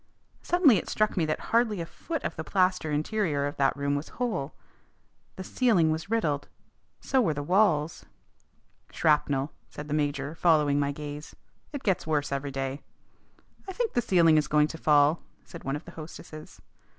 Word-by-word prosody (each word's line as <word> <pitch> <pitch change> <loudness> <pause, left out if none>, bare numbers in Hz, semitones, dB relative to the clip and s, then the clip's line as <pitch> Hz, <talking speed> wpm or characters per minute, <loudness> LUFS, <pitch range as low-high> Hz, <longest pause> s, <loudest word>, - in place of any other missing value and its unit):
Suddenly 335 - +4
it - - -4
struck 215 0 +1
me 165 -5 +1
that 155 - -1
hardly 230 -4 +2
a 165 - -3
foot 320 - -6
of 165 - -3
the 160 - -5
plaster 185 -2 +1
interior 150 -1 0
of 145 - -4
that 135 -1 +2
room 140 0 -1
was 145 +2 -3
whole. 215 - -2 0.8
The 190 - -7
ceiling 185 -8 +2
was 160 +4 -4
riddled. 155 -11 0 0.5
So 265 - +1
were 160 -10 +1
the 145 - -3
walls. 165 -3 +2 0.9
"Shrapnel," 145 -2 +1 0.2
said 150 - -8
the - - -2
major, 145 -1 -1
following 150 -4 +3
my 140 0 0
gaze. 145 +1 -8 0.4
"It 285 -2 -6
gets 190 -5 0
worse 150 -2 0
every 140 +1 -2
day." 135 +1 -4 0.9
"I - - -5
think 460 +2 -2
the 240 - +2
ceiling 170 -7 +4
is 150 - -2
going 150 0 +3
to 160 - -7
fall," 150 +1 +4 0.2
said 170 - -11
one 135 +1 -2
of 145 - -7
the 170 - -10
hostesses. 155 -1 -10
155 Hz, 175 wpm, -27 LUFS, 145-190 Hz, 0.9 s, Suddenly